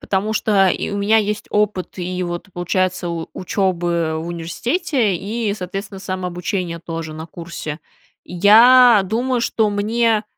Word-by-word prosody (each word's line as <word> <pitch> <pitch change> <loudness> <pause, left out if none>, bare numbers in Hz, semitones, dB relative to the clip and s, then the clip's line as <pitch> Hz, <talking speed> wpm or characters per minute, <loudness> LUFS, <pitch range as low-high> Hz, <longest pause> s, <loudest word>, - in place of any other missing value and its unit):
потому 200 +2 -1
что 200 -3 +3
и - - -1
у 200 - -3
меня 210 +2 +3
есть 210 -1 -1
опыт 210 -3 -1
и, 180 +1 -3
вот, 175 +2 -5
получается, 180 +1 -1
у 165 -1 -4
учебы 175 -4 -1
в 160 - -5
университете 220 - -1
и, 210 +3 -2
соответственно, 195 +1 -6
самообучения 180 -1 -3
тоже 165 -1 -6
на 160 +1 -7
курсе. 165 -2 -7 0.4
Я 225 +5 +6
думаю, 240 +5 -1
что 225 -2 +1
мне, 220 +1 +1
190 Hz, 140 wpm, -19 LUFS, 175-215 Hz, 0.4 s, Я